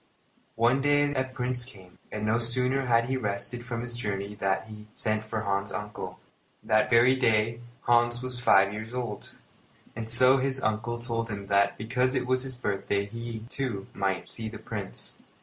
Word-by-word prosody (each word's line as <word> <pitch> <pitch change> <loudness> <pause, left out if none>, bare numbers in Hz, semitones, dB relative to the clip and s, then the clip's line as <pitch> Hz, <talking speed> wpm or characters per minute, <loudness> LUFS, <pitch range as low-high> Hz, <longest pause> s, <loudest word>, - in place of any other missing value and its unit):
One 120 +4 +3
day 145 0 +3
a 130 - +1
Prince 125 -1 -2
came, 95 -8 -13
and 105 0 -3
no 110 +2 +2
sooner 125 +3 +1
had 115 -1 +4
he 130 0 0
rested 115 +2 -3
from 120 -1 -4
his 120 -1 -4
journey 100 -3 -3
than 95 -2 +1
he 105 -1 -10
sent 110 -1 -1
for 110 0 -3
Hans's 100 -1 -1
uncle. 105 0 -5 0.5
That 110 0 +3
very 125 +2 +6
day 115 -2 +2 0.2
Hans 120 0 +3
was 130 -1 -2
five 95 -5 +5
years 110 +3 -6
old, 120 -5 -4 0.6
and 115 0 -5
so 130 +3 +6
his 135 0 0
uncle 115 +1 -1
told 115 -1 -2
him 100 -2 -5
that 100 0 +4
because 125 +4 0
it 125 -1 0
was 130 0 +1
his 130 -1 -4
birthday, 100 -3 -1
he, 115 +1 -6
too, 120 -7 -3
might 95 -1 0
go - - -19
to - - -16
see 110 -1 -5
the - - -8
Prince. - - -7
115 Hz, 185 wpm, -28 LUFS, 105-125 Hz, 0.6 s, very